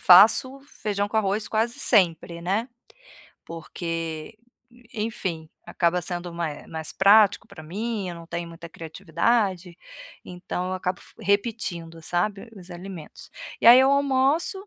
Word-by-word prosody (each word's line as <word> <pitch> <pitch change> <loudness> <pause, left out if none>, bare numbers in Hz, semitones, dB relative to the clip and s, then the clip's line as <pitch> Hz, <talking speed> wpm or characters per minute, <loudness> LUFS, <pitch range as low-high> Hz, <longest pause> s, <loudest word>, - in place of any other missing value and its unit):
faço 225 +9 +6 0.2
feijão 205 -1 -1
com 220 - -3
arroz 210 0 0
quase 225 +2 -1
sempre, 170 -5 +2
né, 205 +8 -1 0.8
porque 165 +2 -6 0.6
enfim, 190 -7 -3 0.2
acaba 175 0 0
sendo 175 0 -3
ma 170 -2 -2
eh, 145 - -10
mais 160 -1 -7
prático 200 +1 +5
para 160 - -12
mim, 205 +4 -4
eu 175 - -5
não 170 0 -11
tenho 170 0 -5
muita 170 0 -11
criatividade, 180 +2 -1 0.5
então 180 0 -5
eu - - -2
acabo 185 0 -3
f - - -17
repetindo, 200 -6 -2
sabe, 195 +6 -2
os 185 -1 -13
alimentos. 175 -3 -10 0.3
E - - +1
aí 245 - +10
eu 265 +1 +5
almoço, 280 +8 +1
185 Hz, 140 wpm, -24 LUFS, 170-220 Hz, 0.8 s, aí